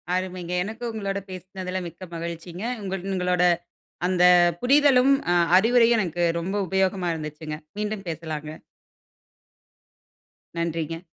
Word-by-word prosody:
அருமைங்க! 185 -1 -3
எனக்கு 220 +4 -7
உங்களோட 200 -3 -3
பேசுனதுல 185 0 -5
மிக்க 170 +3 -10
மகிழ்ச்சிங்க. 170 +2 -6 0.2
உங்கள் 190 -2 -4
உங்களோட 180 -1 +1 0.6
அந்த 180 -1 +2 0.4
புரிதலும், 275 0 +5 0.2
அ - - +4 0.2
அறிவுரையும் 235 +2 +4
எனக்கு 175 -2 -1 0.2
ரொம்ப 185 +4 -3
உபயோகமா 190 -1 +1
இருந்துச்சிங்க. 155 -1 -6 0.2
மீண்டும் 210 -1 -3
பேசலாங்க. 155 -2 -5 2.1
நன்றிங்க. 165 -1 -2
185 Hz, 100 wpm, -24 LUFS, 170-200 Hz, 2.1 s, புரிதலும்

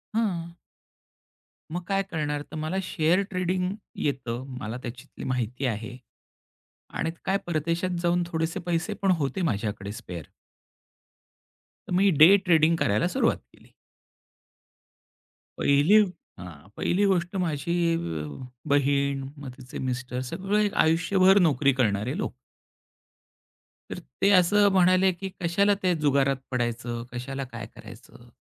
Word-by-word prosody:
हं. 175 -7 -1 1.2
मग 175 +2 -3
काय 195 0 +1
करणार? 150 -2 -2
तर - - -7
मला 155 +4 -3
शेअर 175 +1 +2
ट्रेडिंग 185 0 -1 0.2
येतं. 130 -4 -3 0.2
मला 115 0 -5
त्याच्यातली 120 0 -8
माहिती 125 +1 -2
आहे 115 +1 -3 1.0
आणि 160 - -1
काय 195 +1 +2
परदेशात 170 +2 -1
जाऊन 175 0 +2
थोडेसे 165 +1 -2
पैसे 170 -1 -1
पण 195 -1 +3
होते 140 +7 -2
माझ्याकडे 100 - -2
स्पेअर. 90 -8 -8 1.6
तर - - -4
मी 195 +2 +4
डे 180 +6 +10
ट्रेडिंग 165 -1 +4
करायला 105 +11 +2
सुरुवात 230 +4 +1 0.2
केली. - - -22 1.8
पहिली 145 +9 +4 0.4
हां. 90 -1 -11
पहिली 200 +3 +1
गोष्ट 185 -1 0
माझी 165 0 -2 0.2
अ, 80 - -4 0.4
बहीण 140 -1 +1
मग 140 -3 -8
तिचे 130 -2 -9
मिस्टर, 125 0 -4
सगळे 205 +2 +1 0.2
आयुष्यभर 185 +4 +4
नोकरी 140 -1 +2
करणारे 110 - 0
लोक. 210 - -3 1.6
तर - - -5 0.2
ते 195 - +5
असं 200 +2 +5
म्हणाले 185 0 +4
की 190 +2 -6
कशाला 200 +4 +3
ते 180 -1 +3
जुगारात 140 -2 +2 0.2
पडायचं? 120 -1 -2
कशाला 135 +3 -5
काय 120 -4 -8
करायचं? 120 +1 -14
155 Hz, 120 wpm, -26 LUFS, 125-185 Hz, 1.8 s, डे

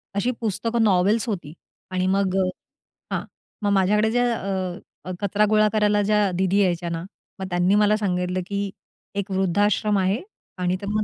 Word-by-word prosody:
अशी 240 +5 +1
पुस्तकं 230 +2 0
नॉवेल्स 205 +3 +3
होती 175 -8 -4 0.4
आणि 185 0 0
मग 195 -1 +1
अ, - - -1 0.7
हां, - - -1 0.4
मग 205 -1 +1
माझ्याकडे 210 +3 +3
ज्या 245 +1 +2
अ, 185 -2 -5
कचरा 205 +1 +2
गोळा 215 0 +4
करायला 210 -1 +3
ज्या 210 -2 +2
दिदी 190 +2 +2
यायच्या 175 -2 0
ना, 165 0 -3 0.4
मग 190 - -3
त्यांनी 180 +3 +2
मला 210 0 +4
सांगितलं, 180 -2 -1
की 200 0 -2 0.5
एक 200 0 -3
वृद्धाश्रम 200 +2 +2
आहे 190 +5 +1 0.4
आणि 180 0 +1
तर - - -5
मग 215 0 0
200 Hz, 165 wpm, -23 LUFS, 185-210 Hz, 0.7 s, गोळा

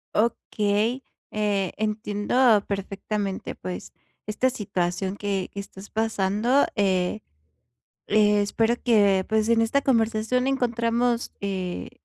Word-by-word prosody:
Okey. 220 +2 0 0.3
Eh, 205 -3 0
entiendo 215 +1 +2
perfectamente, 200 0 -3
pues, 185 - -7 0.4
esta 250 +5 +1
situación 190 -3 -2
que, 200 -2 -2
que 200 - -7
estás 200 0 -10
pasando, 220 +4 +1
eh, 190 0 +1 0.9
espero 210 +2 +3
que, 200 -5 +4
pues, 220 0 +1
en 230 -1 +4
esta 280 +5 +1
conversación 230 +1 +1
encontremos, 240 -2 0
eh, 185 -3 -3
210 Hz, 100 wpm, -25 LUFS, 200-230 Hz, 0.9 s, que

